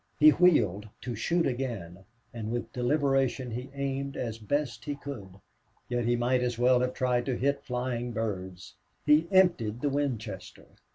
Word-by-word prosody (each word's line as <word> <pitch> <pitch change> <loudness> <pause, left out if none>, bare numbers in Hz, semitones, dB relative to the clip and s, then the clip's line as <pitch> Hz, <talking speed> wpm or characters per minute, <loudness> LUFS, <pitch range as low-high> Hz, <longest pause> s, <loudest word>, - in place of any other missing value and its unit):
He 155 +1 +9
wheeled 110 - +3
to 125 - -4
shoot 165 +10 +1
again, 110 -9 -4 0.3
and 110 -2 -4
with 120 0 -4
deliberation 135 -1 +1
he 125 +4 -5
aimed 140 0 -3
as 115 -2 -4
best 120 +1 -2
he 145 - -2
could. 120 -10 -8 0.5
Yet 120 -1 0
he 120 +1 +2
might 125 +1 +1
as 120 -1 -1
well 125 +1 +4
have 125 0 -1
tried 125 -1 +1
to 130 -3 0
hit 140 +2 0
flying 125 -2 -3
birds. 95 -5 -4 0.3
He 155 +3 +5
emptied 130 - +3
the 145 - +1
Winchester. 115 -9 -3
125 Hz, 160 wpm, -29 LUFS, 115-140 Hz, 0.5 s, He